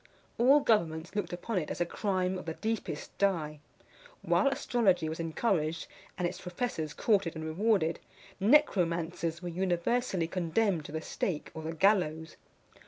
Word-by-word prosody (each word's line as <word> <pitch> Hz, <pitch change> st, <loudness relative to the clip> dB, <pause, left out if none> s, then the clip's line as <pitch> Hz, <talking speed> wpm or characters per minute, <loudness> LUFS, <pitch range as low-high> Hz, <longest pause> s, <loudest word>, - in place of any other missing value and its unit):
All 270 Hz, +5 st, +6 dB
governments 170 Hz, -, +1 dB
looked 205 Hz, -, -2 dB
upon 185 Hz, +4 st, -2 dB
it 155 Hz, -, -5 dB
as -, -, -4 dB
a 175 Hz, -, +2 dB
crime 185 Hz, 0 st, -1 dB
of -, -, -9 dB
the 160 Hz, -, -3 dB
deepest 220 Hz, -9 st, -4 dB
dye. 160 Hz, -7 st, 0 dB, 0.6 s
While -, -, +3 dB
astrology 205 Hz, -11 st, +2 dB
was 160 Hz, +1 st, -4 dB
encouraged, 165 Hz, -1 st, 0 dB, 0.3 s
and 180 Hz, -2 st, +1 dB
its 180 Hz, -, -7 dB
professors 175 Hz, -5 st, -3 dB
courted 200 Hz, -7 st, +1 dB
and 160 Hz, 0 st, -5 dB
rewarded, 170 Hz, 0 st, +1 dB, 0.4 s
necromancers 175 Hz, -, +2 dB
were 175 Hz, -, -3 dB
universally 185 Hz, +2 st, 0 dB
condemned 175 Hz, 0 st, 0 dB
to -, -, -8 dB
the 160 Hz, +1 st, -3 dB
stake 160 Hz, -1 st, -3 dB
or 160 Hz, -, -6 dB
the 160 Hz, +1 st, -4 dB
gallows. 160 Hz, -3 st, +2 dB
175 Hz, 150 wpm, -30 LUFS, 160-205 Hz, 0.6 s, All